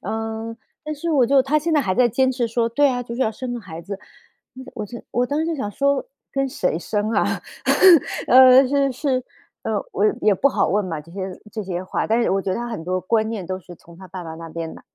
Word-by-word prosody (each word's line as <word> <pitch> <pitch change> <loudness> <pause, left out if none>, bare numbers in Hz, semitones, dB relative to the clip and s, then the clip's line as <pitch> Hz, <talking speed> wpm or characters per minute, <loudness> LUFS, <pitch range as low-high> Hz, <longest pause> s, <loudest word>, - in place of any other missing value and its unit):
呃， 225 +1 -4 0.3
但 305 0 -3
是 330 +3 -3
我 270 -5 +4
就 275 +2 +5
她 275 +3 +2
现 325 +2 -2
在 300 - +4
还 185 -7 -1
在 250 +2 +4
坚 260 +3 +2
持 245 -2 -1
说： 230 0 0
“对 285 +5 +3
啊， 245 -2 -1
就 235 -1 -7
是 255 - 0
要 220 - +1
生 245 +2 -5
个 240 - -5
孩 165 -4 -9
子。” 200 +2 -7 0.8
我 210 -2 -4
就 235 +3 -9
我 245 +1 +1
当 285 +4 -1
时 320 - 0
就 330 -1 -1
想 210 -7 -3
说 280 - +1 0.3
跟 275 0 0
谁 180 -10 -1
生 210 +3 -2
啊？ 205 - +2 1.0
呃， 260 +1 +8
是 275 0 +2
是， 260 -2 -1 0.4
呃， - - -2 0.2
我 - - +1 0.2
也 210 - +4
不 260 - +3
好 260 - +1
问 205 +2 +1
嘛， 160 -4 -4
这 165 +3 -17
些 190 -1 -6
这 215 - -4
些 180 -1 -4
话， 185 - -2
但 225 +2 +2
是 - - +1
我 195 0 +1
觉 190 - -3
得 - - -1
她 240 0 -3
很 225 -8 -5
多 185 +2 -2
观 220 +3 +1
念 210 -5 -4
都 185 +1 -4
是 175 -1 -13
从 170 0 -17
她 190 0 -12
爸 180 0 -7
爸 160 -1 -7
那 165 0 -9
边 165 0 -5
来， - - -13
225 Hz, 275 characters per minute, -22 LUFS, 185-260 Hz, 1.0 s, 呃